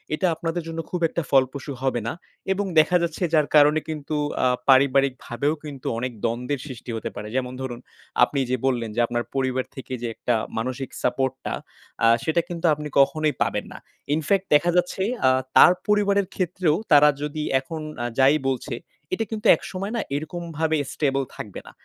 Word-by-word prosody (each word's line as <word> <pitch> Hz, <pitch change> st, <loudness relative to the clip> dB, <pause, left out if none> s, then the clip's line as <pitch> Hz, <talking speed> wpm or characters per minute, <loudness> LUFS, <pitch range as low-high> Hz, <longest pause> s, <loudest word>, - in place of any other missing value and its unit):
এটা 185 Hz, -, +1 dB
আপনাদের 165 Hz, +1 st, -3 dB
জন্য 165 Hz, 0 st, -5 dB
খুব 180 Hz, -, -3 dB
একটা 170 Hz, -, -2 dB
ফলপ্রসূ 135 Hz, +1 st, +2 dB
হবে 130 Hz, -3 st, +1 dB
না। -, -, -1 dB, 0.4 s
এবং 200 Hz, +1 st, -2 dB
দেখা 180 Hz, +3 st, +4 dB
যাচ্ছে 170 Hz, +1 st, -2 dB
যার 155 Hz, -2 st, +4 dB
কারণে 150 Hz, +1 st, +6 dB
কিন্তু 155 Hz, -1 st, -4 dB, 0.3 s
আ -, -, +5 dB, 0.2 s
পারিবারিকভাবেও 135 Hz, 0 st, +3 dB
কিন্তু 140 Hz, -4 st, -7 dB
অনেক 125 Hz, 0 st, -2 dB
দ্বন্দ্বের 125 Hz, +4 st, -1 dB
সৃষ্টি 125 Hz, -3 st, -8 dB
হতে 110 Hz, -, -4 dB
পারে 105 Hz, -, -6 dB
যেমন 125 Hz, -1 st, -1 dB
ধরুন, 120 Hz, -2 st, -5 dB, 0.4 s
আপনি 140 Hz, -, +1 dB
এইযে 130 Hz, 0 st, -1 dB
বললেন 120 Hz, -4 st, 0 dB
যে 120 Hz, -, -1 dB
আপনার 120 Hz, 0 st, -1 dB
পরিবার 130 Hz, -1 st, 0 dB
থেকে 130 Hz, -1 st, -7 dB
যে 120 Hz, -, -2 dB
একটা 120 Hz, -, 0 dB, 0.2 s
মানসিক 130 Hz, +3 st, -3 dB
সাপোর্টটা, 130 Hz, +1 st, -1 dB, 0.5 s
আ -, -, +7 dB, 0.2 s
সেটা 165 Hz, +1 st, +2 dB
কিন্তু 170 Hz, 0 st, -4 dB
আপনি 150 Hz, 0 st, -5 dB
কখনোই 155 Hz, +2 st, +3 dB
পাবেন -, -, -2 dB
না। -, -, -9 dB, 0.4 s
in 155 Hz, -, +1 dB
fact 195 Hz, -1 st, +2 dB
দেখা 175 Hz, +4 st, +3 dB
যাচ্ছে 180 Hz, +2 st, +1 dB, 0.3 s
আ -, -, +7 dB, 0.3 s
তার 180 Hz, -, +9 dB
পরিবারের 200 Hz, -1 st, +2 dB
ক্ষেত্রেও 180 Hz, -3 st, +1 dB, 0.2 s
তারা 150 Hz, 0 st, +8 dB
যদি 150 Hz, +1 st, -3 dB, 0.2 s
এখন 155 Hz, +4 st, -7 dB, 0.2 s
আ -, -, -1 dB
যাই 135 Hz, +3 st, +6 dB
বলছে, 130 Hz, -1 st, -3 dB, 0.4 s
এটা 225 Hz, -, 0 dB
কিন্তু 215 Hz, -1 st, -1 dB
একসময় 195 Hz, +2 st, -6 dB
না 230 Hz, -, 0 dB
এইরকমভাবে 160 Hz, 0 st, -2 dB, 0.2 s
stable 135 Hz, -2 st, 0 dB
থাকবে 105 Hz, -, -7 dB
না। -, -, -10 dB
145 Hz, 175 wpm, -24 LUFS, 130-165 Hz, 0.5 s, তার